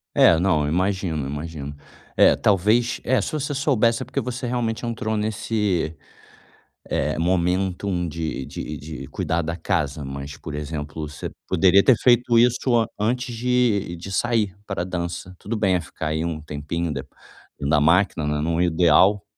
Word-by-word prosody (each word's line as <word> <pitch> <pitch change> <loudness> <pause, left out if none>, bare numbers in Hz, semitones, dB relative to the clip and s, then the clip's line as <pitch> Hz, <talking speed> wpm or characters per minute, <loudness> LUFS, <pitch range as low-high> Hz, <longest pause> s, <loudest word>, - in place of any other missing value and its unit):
É, 85 -1 +6
não, 85 -5 +2
eu - - -1
imagino, 90 -3 0
eu 70 - -4
imagino. 75 -1 -6 0.4
É, - - +6
talvez 110 +5 +2
Eh, 130 0 +2
se - - -3
se - - -8
você 145 -1 -2
soubesse 125 -4 +2
é - - -4
porque 130 - -3
você 125 0 -4
realmente 120 -2 -2
entrou 110 -2 -2
nesse, 105 -6 -1 0.9
eh, - - 0
momento 90 +2 0 0.2
de 80 -4 -4
de 75 0 -6
de 70 -3 -8
cuidar 80 +5 -1
da 85 +1 -3
casa. 80 -5 -1
Mas, 70 +1 -7
por 75 - -7
exemplo, 75 0 -5
você 75 -1 -6 0.2
poderia 95 +2 +5
ter 130 - +6
feito 120 -1 +4
isso 120 +1 +3
a 110 - +1
antes 120 +3 -1
de 120 -7 +1
de 90 +3 -8
sair 110 -3 0
pra 100 -4 -3
dança. 90 0 -5
Tudo 110 +5 -4
bem, 95 -3 +2
eh, 90 - 0
ficar 80 - -6
aí, 80 +1 -1
um 80 -2 -3
tempinho 75 +2 -3
de 65 -1 -4 0.6
na 75 +1 +2
máquina, 80 +1 +3
né, 75 0 -1
não 85 +2 0
ideal 90 +4 +4
90 Hz, 170 wpm, -23 LUFS, 80-110 Hz, 0.9 s, É